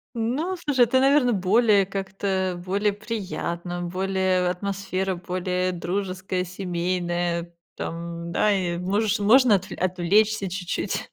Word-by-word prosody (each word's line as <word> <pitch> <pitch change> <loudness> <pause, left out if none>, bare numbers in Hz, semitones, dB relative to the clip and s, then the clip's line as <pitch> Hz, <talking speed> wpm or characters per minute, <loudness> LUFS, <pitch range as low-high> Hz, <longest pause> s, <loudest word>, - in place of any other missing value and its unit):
Ну, 275 +12 -1
слушай, 290 -6 0
это, 260 +3 +3
наверно, 270 -2 +4
более 205 +1 +3
как-то, 190 -2 -2
более 205 +3 +1
приятно, 190 -5 -4
более 185 0 0
атмосфера 190 0 -2
более 180 +1 -2
дружеская, 185 +1 -2
семейная, 175 -1 -2 0.2
там, 170 0 -5
да, 210 - +3
и 180 -3 0
можешь 205 +4 0
можно 225 +2 +6
отвле 190 +1 -4
отвлечься 195 +3 +2
чуть-чуть. 180 -1 -3
190 Hz, 115 wpm, -24 LUFS, 180-205 Hz, 0.2 s, можно